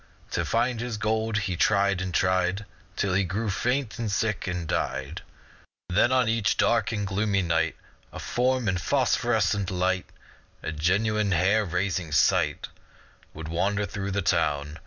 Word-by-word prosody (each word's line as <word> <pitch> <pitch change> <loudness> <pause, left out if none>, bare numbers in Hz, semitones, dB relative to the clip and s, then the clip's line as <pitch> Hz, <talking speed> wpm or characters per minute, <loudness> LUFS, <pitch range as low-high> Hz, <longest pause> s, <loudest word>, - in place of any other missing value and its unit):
To - - 0
find 120 +1 0
his 120 -2 -3
gold 110 0 0
he 95 -2 -2
tried 100 0 +2
and 95 0 -3
tried 95 +2 +1 0.3
Till 95 -2 0
he 100 +2 +3
grew 100 +4 -2
faint, 125 +3 -1
and 110 -3 -2
sick, 105 0 -1
and 90 -2 -3
died 70 +3 -2 0.7
Then 95 +7 +3
on 130 -2 +3
each 110 -2 +1
dark 115 -3 +2
and 105 -2 -2
gloomy 100 0 0
night 80 -1 0 0.4
A - - -9
form 125 -1 0
in 90 -2 +1
phosphorescent 110 -5 +1
white, 95 0 0 0.6
A - - -3
genuine, 100 +6 +1
hair 100 +6 +3
raising, 90 -2 -2
sight, 70 - +2 0.7
Would 80 0 -7
wander 100 +5 0
through 100 -1 -5
the 100 0 -1
town. 75 -3 0
100 Hz, 155 wpm, -26 LUFS, 90-110 Hz, 0.7 s, he